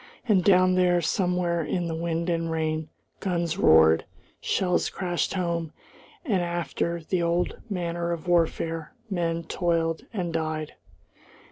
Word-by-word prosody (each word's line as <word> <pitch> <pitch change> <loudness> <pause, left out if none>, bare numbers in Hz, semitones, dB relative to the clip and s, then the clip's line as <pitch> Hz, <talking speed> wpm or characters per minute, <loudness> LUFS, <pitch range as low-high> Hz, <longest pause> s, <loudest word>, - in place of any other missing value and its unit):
And 195 -5 +4
down 185 -1 +5
there, 180 -1 +3
somewhere 175 0 0
in 175 +2 -1
the 165 - -3
wind 165 +1 -2
and 165 -1 0
rain, 160 -1 -1 0.3
guns 175 -1 -1
roared, 80 - +6 0.4
shells 180 -2 +1
crashed 180 0 -2
home, 170 -3 -2 0.5
and, 200 - +1
after 170 0 -2
the 185 -2 +1
old 170 +1 0
manner 170 -3 -2
of 170 0 -4
warfare, 165 -2 0 0.2
men 170 -2 -1
toiled 165 -1 -1
and 180 -6 -3
died. 155 -1 -2
170 Hz, 130 wpm, -26 LUFS, 165-180 Hz, 0.5 s, roared